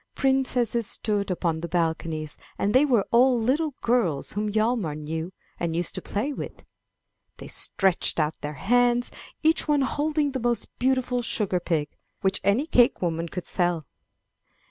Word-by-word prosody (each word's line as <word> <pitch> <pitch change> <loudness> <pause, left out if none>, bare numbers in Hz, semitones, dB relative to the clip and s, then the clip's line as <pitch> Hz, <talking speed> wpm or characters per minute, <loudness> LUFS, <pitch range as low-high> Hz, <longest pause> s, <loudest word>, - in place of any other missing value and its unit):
Princesses 250 -4 +1
stood 205 -2 -1
upon 170 -3 -1
the 170 - -3
balconies, 160 -3 -2 0.2
and 205 +1 0
they 265 +3 +6
were 240 -8 +2
all 245 +1 +5
little 280 +5 0
girls 220 - +1
whom 210 +1 -2
Hjalmar 215 -7 0
knew 160 +3 -4 0.3
and 165 -1 -1
used 175 +1 -1
to - - -5
play 245 +9 -2
with. - - -8 0.7
They - - -9
stretched 190 -3 0
out 155 0 -1
their 150 +1 -4
hands, 245 - +2 0.3
each 320 +1 +3
one 295 -2 +3
holding 295 +2 0
the 260 - -3
most 240 -2 -1
beautiful 255 -1 +1
sugar 205 -5 +1
pig, 160 -4 -1 0.3
which 190 0 0
any 215 +9 +2
cakewoman 175 - +2
could 180 +1 -5
sell. 175 -4 0
215 Hz, 150 wpm, -25 LUFS, 170-250 Hz, 0.7 s, they